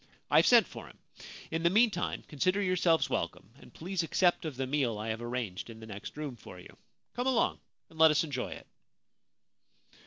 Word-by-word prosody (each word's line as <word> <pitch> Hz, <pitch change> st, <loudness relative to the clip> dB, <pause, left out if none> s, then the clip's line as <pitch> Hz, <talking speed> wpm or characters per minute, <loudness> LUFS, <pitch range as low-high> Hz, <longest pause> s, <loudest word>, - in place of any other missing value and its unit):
I -, -, +5 dB
have -, -, +6 dB
sent -, -, +7 dB
for -, -, -10 dB
him. -, -, -16 dB, 0.5 s
In 165 Hz, -, -1 dB
the 170 Hz, -, +4 dB
meantime 210 Hz, -2 st, +1 dB
consider 185 Hz, +6 st, 0 dB
yourselves 180 Hz, -4 st, +2 dB
welcome, 105 Hz, -, -4 dB
and -, -, -16 dB
please 185 Hz, +3 st, -3 dB
accept 175 Hz, +1 st, +1 dB
of 155 Hz, -4 st, -4 dB
the 135 Hz, -, -1 dB
meal 130 Hz, -5 st, 0 dB
I 110 Hz, +2 st, -4 dB
have 110 Hz, +1 st, -3 dB
arranged 120 Hz, -5 st, -4 dB
in 115 Hz, -1 st, -10 dB
the 110 Hz, -, -10 dB
next 105 Hz, +5 st, -9 dB
room 150 Hz, -4 st, -5 dB
for 90 Hz, -5 st, -12 dB
you. -, -, -14 dB, 0.4 s
Come 245 Hz, +2 st, -2 dB
along 255 Hz, -3 st, +1 dB, 0.3 s
and 160 Hz, -, -15 dB
let 160 Hz, 0 st, +8 dB
us 150 Hz, +1 st, +2 dB
enjoy 140 Hz, -5 st, -4 dB
it.' -, -, -9 dB
150 Hz, 195 wpm, -30 LUFS, 120-180 Hz, 0.5 s, let